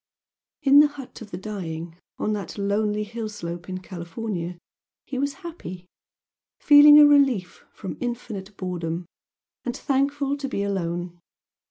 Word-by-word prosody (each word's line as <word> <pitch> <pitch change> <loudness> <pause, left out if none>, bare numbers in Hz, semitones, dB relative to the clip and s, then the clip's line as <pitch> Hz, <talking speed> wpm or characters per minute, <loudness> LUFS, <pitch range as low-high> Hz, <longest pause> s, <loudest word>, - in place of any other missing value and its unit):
In 280 +1 +7
the 300 - +8
"hut 285 -5 -11
of 215 - -9
the 175 - -6
dying" 175 -5 -6 0.2
on 215 - -1
that 200 -3 -5
lonely 210 +1 0
hill 220 +1 -5
slope 175 -4 -7
in 185 0 -4
California 175 0 -5 0.5
he 260 - -4
was 280 +1 -1
happy, 185 - -8 0.7
feeling 295 0 +9
a 300 - +10
relief 270 -11 +3
from 190 - -7
infinite 215 -5 -5
boredom, 175 -2 -3 0.6
and 245 - -3
thankful 280 +1 0
to 275 -1 -4
be 200 - -2
alone. 175 -3 -3
210 Hz, 140 wpm, -24 LUFS, 180-270 Hz, 0.7 s, a